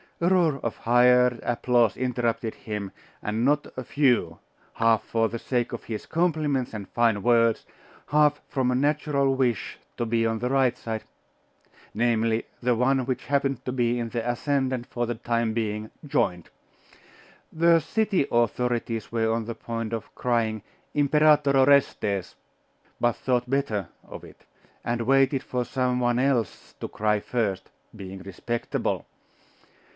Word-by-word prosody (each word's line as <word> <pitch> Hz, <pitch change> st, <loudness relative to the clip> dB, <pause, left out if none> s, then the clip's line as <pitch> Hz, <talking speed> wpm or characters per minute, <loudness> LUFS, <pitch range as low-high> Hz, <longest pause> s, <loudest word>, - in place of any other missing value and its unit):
A 170 Hz, -, +2 dB
roar 170 Hz, -6 st, +3 dB
of 115 Hz, -, -3 dB
hired 125 Hz, 0 st, +4 dB
applause 120 Hz, -2 st, +2 dB
interrupted 120 Hz, -3 st, -1 dB
him 105 Hz, -3 st, -5 dB, 0.3 s
and 110 Hz, +2 st, -1 dB
not 145 Hz, +2 st, +2 dB
a 130 Hz, -, -5 dB
few, 120 Hz, -, +1 dB, 0.4 s
half 115 Hz, -1 st, +3 dB
for 115 Hz, -1 st, 0 dB
the 115 Hz, -, -5 dB
sake 120 Hz, -1 st, -1 dB
of 120 Hz, -, -6 dB
his 110 Hz, -2 st, -5 dB
compliments 155 Hz, -7 st, 0 dB
and 100 Hz, -3 st, -6 dB
fine 115 Hz, -3 st, +2 dB
words, 115 Hz, -1 st, +3 dB, 0.4 s
half 150 Hz, 0 st, +3 dB
from 130 Hz, -3 st, 0 dB
a 125 Hz, -, +1 dB
natural 140 Hz, 0 st, +1 dB
wish 125 Hz, -7 st, -1 dB, 0.2 s
to 120 Hz, -, -1 dB
be 115 Hz, 0 st, +1 dB
on 115 Hz, 0 st, 0 dB
the 125 Hz, +2 st, -1 dB
right 130 Hz, -2 st, +2 dB
side 110 Hz, -1 st, -5 dB, 0.9 s
namely, 115 Hz, 0 st, +1 dB, 0.2 s
the 125 Hz, -1 st, +2 dB
one 130 Hz, +2 st, +2 dB
which 130 Hz, 0 st, -3 dB
happened 140 Hz, -2 st, 0 dB
to 125 Hz, -, -2 dB
be 120 Hz, -1 st, 0 dB
in 115 Hz, -1 st, -3 dB
the 115 Hz, 0 st, -3 dB
ascendant 130 Hz, 0 st, -1 dB
for 120 Hz, 0 st, -2 dB
the 120 Hz, 0 st, -3 dB
time 115 Hz, 0 st, -1 dB
being 110 Hz, -1 st, -2 dB, 0.2 s
joined.... 90 Hz, -, -1 dB, 1.0 s
The 170 Hz, +1 st, +4 dB
city 195 Hz, -1 st, 0 dB
authorities 120 Hz, -1 st, 0 dB
were 115 Hz, -1 st, +1 dB
on 115 Hz, 0 st, -1 dB
the 115 Hz, 0 st, -5 dB
point 115 Hz, -1 st, -5 dB
of 115 Hz, -, -5 dB
crying, 115 Hz, -4 st, 0 dB, 0.3 s
'Imperator 150 Hz, -1 st, +4 dB
Orestes,' 130 Hz, -8 st, +2 dB, 0.6 s
but 120 Hz, -1 st, +2 dB
thought 125 Hz, -1 st, -1 dB
better 110 Hz, -9 st, -1 dB, 0.2 s
of -, -, -9 dB
it; -, -, -15 dB, 0.4 s
and 120 Hz, 0 st, -1 dB
waited 135 Hz, +2 st, +3 dB
for 125 Hz, -3 st, -2 dB
some 125 Hz, 0 st, -1 dB
one 120 Hz, -1 st, +1 dB
else 125 Hz, -4 st, -1 dB
to -, -, -4 dB
cry 105 Hz, 0 st, 0 dB
first 105 Hz, -4 st, -2 dB, 0.3 s
being 95 Hz, -2 st, -8 dB
respectable. 100 Hz, +5 st, -3 dB
120 Hz, 150 wpm, -25 LUFS, 115-135 Hz, 1.0 s, hired